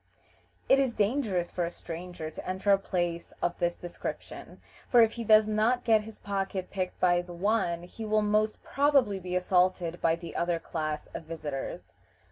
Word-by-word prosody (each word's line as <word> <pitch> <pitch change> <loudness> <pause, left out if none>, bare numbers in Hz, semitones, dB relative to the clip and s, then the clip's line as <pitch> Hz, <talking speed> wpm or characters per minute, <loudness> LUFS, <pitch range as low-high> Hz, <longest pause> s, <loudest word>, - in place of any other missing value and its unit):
It 270 - +6
is 265 -4 +1
dangerous 205 -5 0
for 180 - -1
a 170 - -1
stranger 170 -1 -7
to - - -7
enter 190 +2 +1
a 195 - +5
place 175 -3 -2
of 175 - -1
this 175 -1 +1
description, 175 -1 -7 0.3
for 240 - +7
if 225 - +3
he 235 0 -5
does 215 0 +6
not 220 +4 +1
get 220 -2 +4
his 215 0 -10
pocket 195 -2 -3
picked 185 -2 -3
by 175 -1 +4
the 175 0 -10
one, 175 -2 0
he 180 +5 -9
will 215 0 +2
most 215 +1 +1
probably 275 -8 +2
be 180 0 -4
assaulted 180 -1 +1
by 165 0 +3
the 170 0 -9
other 170 0 +1
class 155 -2 -3
of - - -6
visitors. 150 -4 -6
185 Hz, 180 wpm, -29 LUFS, 175-215 Hz, 0.3 s, for